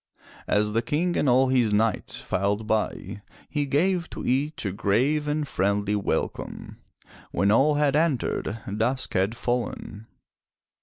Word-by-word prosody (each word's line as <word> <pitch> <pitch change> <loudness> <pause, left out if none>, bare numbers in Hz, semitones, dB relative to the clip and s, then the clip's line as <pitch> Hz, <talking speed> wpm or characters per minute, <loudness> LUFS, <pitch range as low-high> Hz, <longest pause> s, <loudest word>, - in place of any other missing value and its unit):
As 105 0 +1
the 115 - +2
King 160 +9 0
and 140 - +2
all 130 +1 +4
his 125 -4 +3
knights 110 +1 0
filed 100 +3 -1
by, 105 -2 -2 0.3
he 145 -2 -2
gave 175 +5 +1
to - - -7
each 140 +2 0
a 100 - 0
grave 130 +10 +1
and 150 0 -1
friendly 100 -1 0
welcome. 100 - -3 0.5
When 100 +3 +2
all 140 +7 +4
had 145 -1 +2
entered, 145 -7 0 0.2
dusk 130 +3 0
had 95 +5 0
fallen. 115 -3 -3
120 Hz, 140 wpm, -25 LUFS, 105-145 Hz, 0.5 s, all